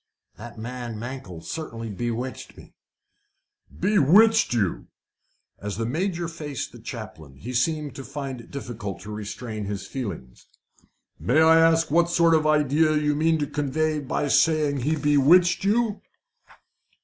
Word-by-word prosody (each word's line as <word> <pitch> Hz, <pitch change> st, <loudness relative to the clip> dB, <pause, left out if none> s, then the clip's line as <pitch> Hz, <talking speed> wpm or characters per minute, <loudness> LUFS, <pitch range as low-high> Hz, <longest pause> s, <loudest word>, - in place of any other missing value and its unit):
"The 120 Hz, +1 st, -10 dB
man, 120 Hz, 0 st, -6 dB
Mankell, 115 Hz, -8 st, -7 dB
certainly 115 Hz, -, -6 dB
bewitched 120 Hz, +4 st, -5 dB
me." -, -, -15 dB, 1.1 s
"Bewitched 210 Hz, -, +4 dB
you!" 105 Hz, -8 st, -1 dB, 0.7 s
As 105 Hz, -1 st, -5 dB
the 115 Hz, -, -2 dB
Major 170 Hz, -, -2 dB
faced 150 Hz, -6 st, -6 dB
the -, -, -13 dB
chaplain 70 Hz, -4 st, -9 dB
he 120 Hz, -, -8 dB
seemed 150 Hz, +2 st, 0 dB
to 135 Hz, -, -6 dB
find 135 Hz, -1 st, -6 dB
it 115 Hz, -, -17 dB
difficult 115 Hz, -7 st, -6 dB
to 105 Hz, +2 st, -8 dB
restrain 105 Hz, +1 st, -6 dB
his 100 Hz, -1 st, -5 dB
feelings. 90 Hz, -, -7 dB, 0.7 s
"May 130 Hz, +6 st, +2 dB
I 160 Hz, 0 st, +6 dB
ask 165 Hz, -1 st, +3 dB
what 170 Hz, +2 st, +3 dB
sort 170 Hz, -1 st, +4 dB
of 155 Hz, -1 st, +3 dB
idea 155 Hz, +1 st, +3 dB
you 150 Hz, 0 st, +1 dB
mean 160 Hz, +2 st, +2 dB
to 150 Hz, -, -1 dB
convey 150 Hz, +2 st, -1 dB
by 145 Hz, +1 st, -2 dB
saying 150 Hz, -1 st, +2 dB
he 145 Hz, +5 st, 0 dB
bewitched 150 Hz, +5 st, +4 dB
you?" 215 Hz, +1 st, +1 dB
145 Hz, 140 wpm, -24 LUFS, 115-160 Hz, 1.1 s, I